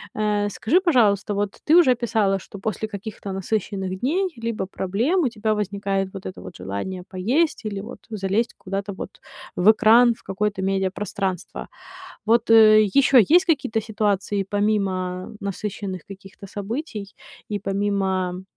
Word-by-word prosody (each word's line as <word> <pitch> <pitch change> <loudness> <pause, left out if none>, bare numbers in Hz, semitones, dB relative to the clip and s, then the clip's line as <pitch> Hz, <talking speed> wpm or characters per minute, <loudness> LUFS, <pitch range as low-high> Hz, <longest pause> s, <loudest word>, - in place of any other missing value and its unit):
Э, 210 -1 0
скажи, 250 - +2
пожалуйста, 215 - +3
вот 200 0 -2
ты 310 - +5
уже 290 -8 +6
писала, 210 -5 +1
что 200 - -11
после 220 +1 -3
каких-то 205 -1 -7
насыщенных 190 -1 -3
дней 360 +8 0
либо 230 -4 -3
проблем 220 - 0
у 260 - +2
тебя 220 -1 -1
возникает 195 -1 -2
вот 190 - -8
это 185 - -7
вот - - -10
желание 100 - -5
поесть 235 - 0
или 200 -2 -3
вот 230 +4 -9
залезть 210 +2 -1
куда-то 195 +1 -4
вот - - -9 0.4
в 195 +5 +6
экран, 235 +2 +5
в - - -21
какое-то 200 0 -2
медиапространство. 190 -1 -2 0.6
Вот, 230 +1 +2
э, 215 -1 +8
ещё 265 +6 +4
есть 345 - +5
какие-то 240 -9 0
ситуации 205 -2 -1
помимо 195 -2 -1
насыщенных 200 -2 -4
каких-то 195 0 -12
событий 205 +1 -6 0.3
и 205 -1 -2
помимо, 190 -2 -1
205 Hz, 140 wpm, -23 LUFS, 195-225 Hz, 0.6 s, э